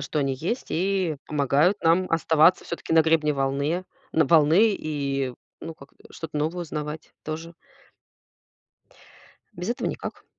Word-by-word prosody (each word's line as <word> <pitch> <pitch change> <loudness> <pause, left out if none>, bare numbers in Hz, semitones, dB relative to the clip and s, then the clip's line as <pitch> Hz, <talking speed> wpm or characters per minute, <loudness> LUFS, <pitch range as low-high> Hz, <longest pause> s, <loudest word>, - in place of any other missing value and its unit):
что 150 +2 -3
они 135 -2 0
есть 175 - -3
и 185 -2 0
помогают 150 +6 +2
нам 170 +3 +3
оставаться 165 +1 +4
всё-таки 170 - -5
на 160 - +6
гребне 160 -2 +2
волны 140 +6 -1 0.3
на 160 -1 +3
волны 170 +8 +5
и, 140 -4 -2 0.3
ну, 165 - -7
как-то, 140 -2 -17 0.2
что-то 165 -2 -7
новое 160 +4 -1
узнавать 150 -1 -6
тоже. 160 +2 -6 2.0
Без 180 +4 -6
этого 240 - -2
никак. - - -7
160 Hz, 135 wpm, -25 LUFS, 150-170 Hz, 2.0 s, на